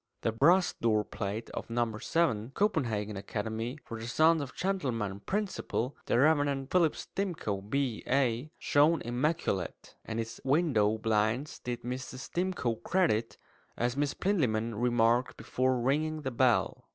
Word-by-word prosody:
The 115 - +1
brass 170 +11 +4
doorplate 110 -1 -1
of - - -6
No. 115 -1 0
7 125 -6 0
"Copenhagen 115 - 0
Academy 110 +5 -4
for 115 -2 -6
the 115 - -6
Sons 160 +5 +4
of 135 -3 -7
Gentlemen. 120 - -1
Principal, 185 - -2
the - - +2
Rev. 145 -1 +3
Philip 170 -4 +3
Stimcoe, 170 - -3
B.A. 130 -1 0
(Oxon.)" - - -17
shone 150 +3 +3
immaculate; 120 - -2
and 110 0 -4
its 115 0 -5
window 130 -8 +2
blinds 110 +5 0
did 120 -1 -5
Mrs. 130 +1 -6
Stimcoe 175 -11 -1
credit, 140 - +1 0.4
as 120 +1 0
Miss 145 0 0
Plinlimmon 115 - 0
remarked 120 +2 +2
before 130 0 0
ringing 155 +5 0
the 130 - -2
bell. 125 0 +1
125 Hz, 135 wpm, -30 LUFS, 115-155 Hz, 0.4 s, brass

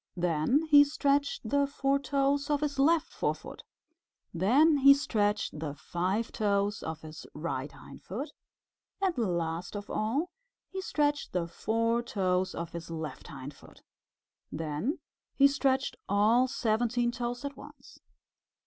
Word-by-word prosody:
Then 175 - +2
he 295 -2 +7
stretched 285 -3 0
the 280 +4 +2
four 275 0 0
toes 280 0 0
of 295 -1 +1
his 290 -2 -2
left 320 +3 +3
forefoot. - - -3 0.7
Next 275 - +4
he 275 0 +9
stretched 210 - -1
the 150 -2 -4
five 185 +9 -2
toes 205 -1 0
of 160 0 -5
his 155 0 -10
right 145 -3 -3
hindfoot. 245 - -8 0.7
And 380 -3 +1
last 175 -4 -2
of 205 0 -6
all 270 +11 -1 0.4
he 380 - -4
stretched 295 -5 0
the 175 -2 0
four 230 +6 0
toes 185 -5 -1
of 170 0 -5
his 170 0 -7
left 160 -2 -6
hindfoot. 140 +1 -11 0.7
Then 160 - -2 0.4
he 275 - +7
stretched 275 -1 0
all 220 +6 +4
seventeen 240 0 0
toes 245 +2 -4
at 280 - -5
once. - - -14
230 Hz, 130 wpm, -30 LUFS, 175-280 Hz, 0.7 s, he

